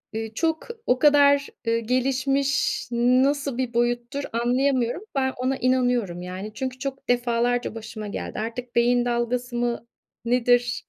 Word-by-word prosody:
ııı, 225 0 -4
çok 320 +6 -1 0.2
o 250 - +2
kadar, 285 -1 +5 0.2
ııı, 230 0 +3
gelişmiş 270 +3 0
nasıl 255 +3 +2
bir 255 -2 -2
boyuttur, 240 +4 0
anlayamıyorum. 250 +4 +1
Ben 265 -1 +1
ona 260 +2 -1
inanıyorum, 245 -8 +1
yani, 185 +4 -6
çünkü 260 +3 -4
çok 270 0 -5
defalarca 245 -1 +1
başıma 220 -1 -7
geldi. 200 - -5
Artık 235 +3 -5
beyin 240 +1 +3
dalgası 240 +1 -1
mı 240 -1 -2 0.4
nedir? 245 -1 +2
245 Hz, 130 wpm, -24 LUFS, 235-265 Hz, 0.4 s, kadar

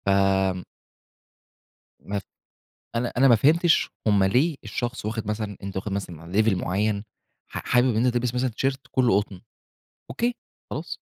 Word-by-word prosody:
فم 95 -1 +2 1.4
ما 100 0 -3
ف - - -15 0.7
أنا 120 +1 -1
أنا 135 +2 +6
ما 120 - +8
فهمتش 160 +8 +4 0.2
هم 100 -2 +4
ليه 135 - +2
الشخص 120 +3 -4
واخد 110 0 -3
مثلًا 105 -2 -3
أنت 100 0 -6
واخد 100 +2 -3
مثلًا 85 -4 -5
level 110 -2 +3
معّين 100 +3 -1 0.5
ح - - -4
حابب 125 -1 +3
إن 115 - +2
أنت 125 - +2
تلبس 120 0 0
مثلّا 125 +1 +1
تيشيرت 135 +4 -1
كُلّه 125 -7 +3
قطن 100 -3 -9 0.7
أوكي، 240 +1 -1 0.4
خلاص. - - -5
110 Hz, 150 wpm, -25 LUFS, 100-125 Hz, 1.4 s, ما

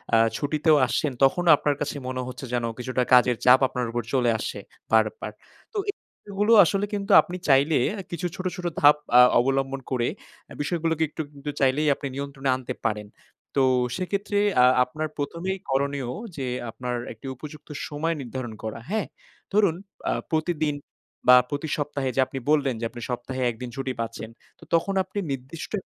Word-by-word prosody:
আ - - +6 0.2
ছুটিতেও 155 +2 +2
আসছেন 140 +4 0
তখনও 175 +6 +3
আপনার 145 0 0
কাছে 150 0 -2
মনে 130 0 -3
হচ্ছে 130 +1 -7
যেন 120 -1 0 0.2
কিছুটা 125 +1 -1
কাজের 125 -1 +6
চাপ 125 +1 +8
আপনার 125 -1 -3
উপর 120 0 -2
চলে 125 -3 +3
আসছে - - -4 0.3
বারবার। 460 - +1 0.4
তো - - -4 0.5
এগুলো 205 +3 +1
আসলে 200 +4 0
কিন্তু 200 -1 -2
আপনি 180 - -7
চাইলে 140 +3 +5 0.3
কিছু 175 +1 -2
ছোট, 185 - -7
ছোট 180 -2 -7 0.2
ধাপ 145 0 +8 0.2
আ - - +10 0.2
অবলম্বন 135 +1 0
করে 120 -2 +1 0.5
বিষয় 170 +4 -1
গুলোকে 160 -1 +1
একটু 155 - -5
কিন্তু 140 +1 -7
চাইলেই 140 +3 +2
আপনি 140 - -5
নিয়ন্ত্রণে 140 -1 -3
আনতে 130 -1 -5
পারেন। 105 -1 -3 0.5
তো - - +5 0.3
সেক্ষেত্রে 200 +2 -1 0.2
আ - - +8 0.2
আপনার 155 +5 -4
প্রথমেই 170 +6 -3
করণীয় 135 -1 0 0.3
যে 135 - -3 0.2
আপনার 125 +2 -4 0.2
একটি 115 - -17
উপযুক্ত 150 +3 -11 0.2
সময় 160 +2 -2
নির্ধারণ 125 -2 -6
করা, 110 +1 -4
হ্যাঁ? 215 0 -1 0.5
ধরুন 200 -5 +4 0.4
আ - - +2 0.2
প্রতিদিন 155 -2 0 0.5
বা 125 - +10
প্রতি 145 +2 -3
সপ্তাহে 145 -2 -2
যে - - 0
আপনি 135 +1 -5
বললেন 145 -3 +3
যে 115 - -2
আপনি 120 +1 -10
সপ্তাহে 130 +1 -4
১ 115 - -4
দিন 125 - -4
ছুটি 135 -1 -3
পাচ্ছেন 115 -1 -4 0.3
তো - - -15
তখন 170 +4 +2
আপনি 205 - -5
নির্দিষ্ট 135 +4 -6
140 Hz, 170 wpm, -25 LUFS, 125-160 Hz, 0.5 s, আ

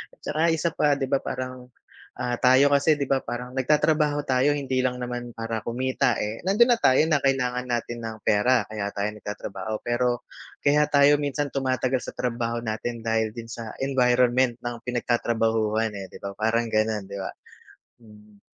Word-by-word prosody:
At - - -41
tsaka 155 +1 -2
isa 165 0 +1
pa 145 -2 +2
'di 135 -1 -3
ba 140 - +3
parang, 130 -1 -6 0.5
ah, 125 -1 -1
tayo 130 +3 +5
kasi 150 +2 +4
'di 140 - 0
ba, 135 -1 +2
parang 125 +1 -5
nagtatrabaho 150 +2 +2
tayo 130 +2 +3
hindi 135 -2 -1
lang 125 -1 0
naman 120 0 -5
para 115 -1 -3
kumita 125 -1 0
eh, 105 +2 -4
nandun 235 +6 +5
na 230 - -1
tayo 130 - +5
na 145 -3 +2
kailangan 125 -2 0
natin 120 0 -2
ng 110 -1 -5
pera, 120 +3 +3
kaya 105 -2 -3
tayo 100 +1 -1
nagtatrabaho 105 +1 -6
pero, 120 0 0 0.4
kaya 150 +1 +4
tayo 145 0 +6
minsan 145 0 -2
tumatagal 130 -1 0
sa - - -9
trabaho 120 -1 -2
natin 115 +1 -4
dahil 110 -1 +1
din 115 - -6
sa, 115 -1 -7 0.2
environment 125 -2 +3
ng 120 0 -4
pinagtatrabahuhan 115 -2 0
eh, 95 -1 -6
'di - - -10
ba? 100 - -4
Parang 115 +2 +1
ganon 110 -1 0
di 100 - -6
ba? - - -4 0.7
Hmm. 105 -2 -18
125 Hz, 175 wpm, -25 LUFS, 115-135 Hz, 0.7 s, tayo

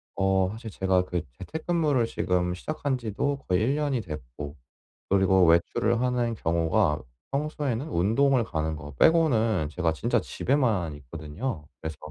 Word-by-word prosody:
어 95 -1 +2
사실 110 +1 -7
제가 95 -2 +1
그 90 -3 -2 0.2
재택근무를 155 -6 0
지금 90 -4 0
시작한지도 135 +3 -2
거의 90 +1 +2
1 140 -1 +1
됐고, 75 -3 -7 0.6
그리고 95 -1 +4
외출을 85 +7 +3
하는 125 -2 0
경우가 80 -5 +1 0.3
평소에는 145 -2 -2
운동을 120 +7 +3
가는 80 -3 -2
거 75 -2 -8
빼고는 115 - +3
제가 85 0 0
진짜 75 - +1
집에만 110 - 0
있거든요. 75 - -6 0.2
그래서 80 -1 -4
95 Hz, 295 characters per minute, -27 LUFS, 80-130 Hz, 0.6 s, 그리고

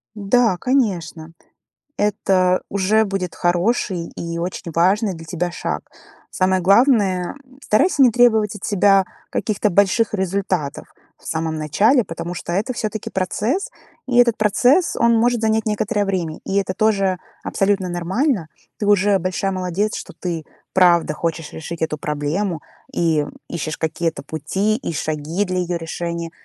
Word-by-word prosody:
Да, 210 0 +2
конечно, 175 - -1 0.6
это 185 -3 +2
уже 200 +3 +2
будет 195 -3 -3
хороший 175 0 0
и 170 0 -4
очень 170 -1 -4
важный 190 +5 +2
для 165 -1 -10
тебя 175 +2 -3
шаг. - - -4 0.4
Самое 185 0 +1
главное 200 -1 +3 0.3
старайся 280 - +3
не 250 - +7
требовать 220 -3 +3
от 200 - -11
себя 195 -1 +4 0.3
каких-то 210 -1 0
больших 200 +4 +3
результатов 190 -6 -2 0.3
в - - -19
самом 160 0 -2
начале, 205 - +3
потому 170 0 -6
что 170 - -5
это 205 +8 0
все-таки 220 -2 -4
процесс. 215 - -1 0.4
И 245 - 0
этот 240 -2 +5
процесс, 250 - +3
он 235 0 +4
может 240 +1 +2
занять 220 -1 +1
некоторое 210 0 0
время. 175 -5 -2
И 195 - -2
это 190 -2 0
тоже 195 -4 +1 0.3
абсолютно 195 -1 0
нормально. 180 - -1 0.3
Ты 205 - -2
уже 205 -1 +4
большая 185 +2 -1
молодец, 185 +3 -1
что - - -8
ты, 170 -3 -3 0.3
правда, 170 -4 +4
хочешь 165 -1 -3
решить 165 +1 -7
эту 160 -1 -1
проблему 150 +4 -2 0.3
и 160 -3 +1 0.2
ищешь 155 -2 -4
какие-то 160 -1 -2
пути, 195 +8 -1
и 225 - -5
шаги 155 +4 -2
для 185 -1 -2
ее 175 -1 -1
решения. 170 0 -4
190 Hz, 145 wpm, -20 LUFS, 170-215 Hz, 0.6 s, не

